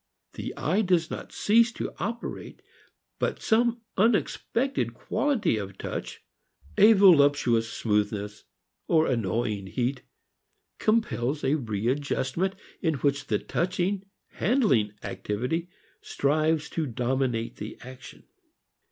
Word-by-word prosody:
The - - -5
eye 185 +8 +1
does 180 -5 +1
not - - -6
cease 230 +3 +3
to - - -5
operate 230 +6 -5 0.6
but - - -1
some 235 +1 +2 0.2
unexpected 230 +5 +1
quality 230 - 0
of 100 -2 -6
touch, - - -6 0.5
a 220 +2 +7
voluptuous 145 - +5
smoothness 105 -1 -1 0.4
or 160 -1 +4
annoying 110 -3 -1
heat, 130 +5 -2 0.8
compels 155 - 0
a 135 - +2
readjustment 130 - -1 0.3
in 160 -4 +1
which 140 0 0
the - - +1
touching, 185 +2 -1 0.3
handling 140 - +2
activity 125 +12 -3 0.3
strives 155 +2 +1
to 160 -3 -1
dominate 125 -1 -1
the 105 +1 -7
action. 130 +1 -11
145 Hz, 105 wpm, -27 LUFS, 120-195 Hz, 0.8 s, a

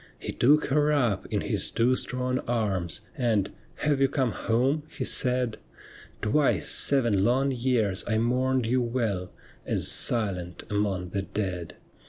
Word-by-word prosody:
He - - -5
took 150 +5 +3
her 150 +2 +2
up 120 -10 +1
in - - -1
his - - 0
two 120 +2 +2
strong 130 0 -1
arms, 95 -9 -1
And, 110 -6 0
' - - -31
Have 145 -2 +2
you 135 - +5
come 130 -3 0
home? 130 +9 0
' - - -25
he - - -2
said; 125 -2 +1 0.3
' - - -21
Twice 140 +7 +2
seven 120 -9 +2
long 130 +5 +2
years 120 -6 +1
I 110 - +1
mourned 125 +2 +1
you 125 +3 +1
well 115 -7 -2 0.3
As - - -1
silent 90 -7 -1
among 100 -3 -1
the 100 +2 -2
dead.' 90 -4 -4
120 Hz, 160 wpm, -27 LUFS, 100-130 Hz, 0.3 s, you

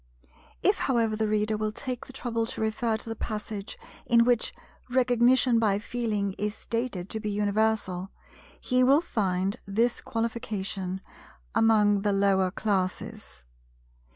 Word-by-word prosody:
If - - +4
however 230 -4 +1
the 220 0 0
Reader 215 0 +1
will 215 0 -1
take 250 +2 -5
the - - -10
trouble 230 -3 -2
to - - -5
refer 220 +1 0
to 225 - -8
the 225 - -3
passage 210 -2 -5 0.3
in 235 -1 +5
which 245 -2 +2 0.4
Recognition 245 -1 +4
by 210 -3 +2
Feeling 210 -3 -2
is 210 +1 -1
stated 230 -6 -3
to 220 - -2
be 210 -1 -3
universal, 205 -2 0 0.5
he 255 0 +2
will 275 +4 +5
find 195 - -1
this 230 +5 +1
qualification—"among 210 - -1
the 205 0 +1
lower 195 -1 +3
classes." 185 - -3
215 Hz, 130 wpm, -27 LUFS, 200-235 Hz, 0.5 s, in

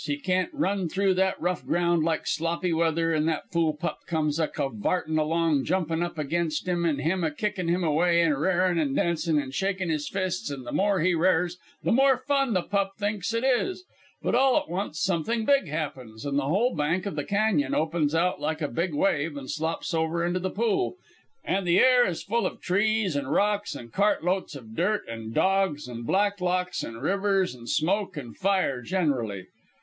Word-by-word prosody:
He 145 -2 -2
can't 185 +4 0
run 200 - -1
through 195 +2 +2
that 190 +1 +1
rough 180 +1 -1
ground 170 -2 +1
like 160 0 0
Sloppy 170 +2 -1
Weather, 165 0 +1
an' 155 0 +1
that 160 -2 -2
fool 165 -2 +1
pup 165 +3 -4
comes 155 -2 0
a 160 - +2
cavartin' 155 - -1
along, 155 -2 +1
jumpin' 170 -3 0
up 175 -1 -3
against 155 +2 -1
him, 175 -1 +1
an' 150 -4 +1
him 170 +6 0
a 160 - +2
kickin' 185 +3 -3
him 175 +2 +1
away, 170 +2 +3
an' 165 - +3
r'arin', 175 +4 +1
an' 140 -3 0
dancin', 170 -2 +1
an' 135 -2 -4
shakin' 190 +2 -1
his 150 -2 -2
fists, 185 -4 -2
an' 140 -2 -6
the - - -7
more 200 -2 +2
he 180 +2 +3
r'ars 180 +1 +1 0.2
the - - +1
more 265 +2 +5
fun 275 -4 0
the 180 -2 +1
pup 200 -1 -1
thinks 205 0 -2
it 230 +1 -1
is. 310 +9 +1 0.4
But - - 0
all 265 +2 +4
at 300 - -1
once 175 -3 -3
something 195 +6 0
big 275 -7 +3
happens, 135 -7 -5
an' 140 -1 -2
the 140 -1 +1
whole 210 - +2
bank 160 +5 0
of 200 - -3
the 145 - -2
cañon 200 -9 +1
opens 155 -1 0
out 180 +2 +1
like 155 +1 -2
a - - +1
big 170 +5 -2
wave, 150 -3 +1
and 135 -2 -6
slops 160 +2 -3
over 165 +1 0
into 175 +1 0
the 185 +1 -2
pool, 235 - 0 0.5
an' 195 +1 0
the 175 0 +3
air 250 +1 +6
is 170 - -3
full 235 +3 0
of - - -8
trees 205 -1 +1
an' 140 -2 -2
rocks 205 +3 +1
and 115 -4 -10
cart 200 -2 +2
loads 180 -3 -1
of 110 -5 -10
dirt 210 - +1
an' 115 -1 -6
dogs 190 -3 +1
and 120 -1 -7
Blacklocks 185 -2 0
and 115 +2 -7
rivers 195 -2 +1
an' 120 -1 -12
smoke 185 - 0
an' 120 -5 -7
fire 190 -10 0
generally. 125 - -1
170 Hz, 200 wpm, -26 LUFS, 150-195 Hz, 0.5 s, air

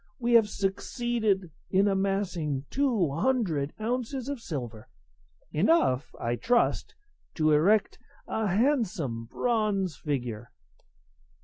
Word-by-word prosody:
we 240 -1 0
have 225 -3 +6
succeeded 200 -1 -1 0.2
in 195 +2 +3
amassing 190 -8 -1
two 240 - +1
hundred 165 - 0
ounces 250 +3 -2
of 285 -3 -3
silver 120 - -6 0.6
enough, 155 - +2
I 120 +1 -1
trust, 240 - +1 0.4
to 155 -1 +2
erect 195 +8 +3 0.3
a 220 -1 -1
handsome 195 - 0
bronze 205 - 0
figure." 120 -6 -4
195 Hz, 100 wpm, -28 LUFS, 150-235 Hz, 0.6 s, have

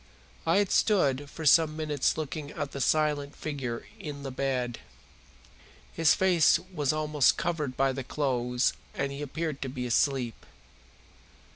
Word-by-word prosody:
I - - +4
had 200 -1 +2
stood 145 - +2
for 160 - -7
some 155 +1 +5
minutes 150 -3 0
looking 150 -1 -4
at 145 -2 -5
the 140 - -5
silent 150 -1 +1
figure 130 -6 -4
in 145 -2 -7
the 135 - -5
bed. 130 -2 -2 1.1
His 165 -2 +4
face 180 -5 +4 0.2
was 145 -5 +1
almost 150 -3 +2
covered 155 -7 -2
by 135 0 +3
the 130 0 -4
clothes 125 -3 0 0.2
and 140 - -1
he 140 +1 -6
appeared 150 0 -4
to 135 - -3
be 125 -1 -4
asleep. 125 -1 0
145 Hz, 145 wpm, -28 LUFS, 130-155 Hz, 1.1 s, some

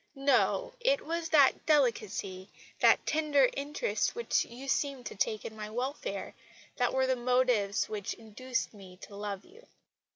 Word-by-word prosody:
No, 275 - +2
it - - +1
was 335 0 -2
that 285 -4 +5
delicacy, 210 -9 +1 0.3
that - - +5
tender 295 -4 +3
interest 295 - -1
which 470 0 +1
you 250 +4 -10
seemed 275 -2 -1
to - - -6
take 215 +1 -1
in 220 - -6
my 210 -1 -6
welfare, 265 - -4 0.4
that 245 - +2
were 265 0 +2
the 260 0 +2
motives 245 -5 +2
which 205 -2 -4
induced 230 +4 -4
me 190 -3 -13
to 200 - -10
love 200 -1 -5
you." 455 +7 -18
255 Hz, 155 wpm, -31 LUFS, 215-295 Hz, 0.4 s, that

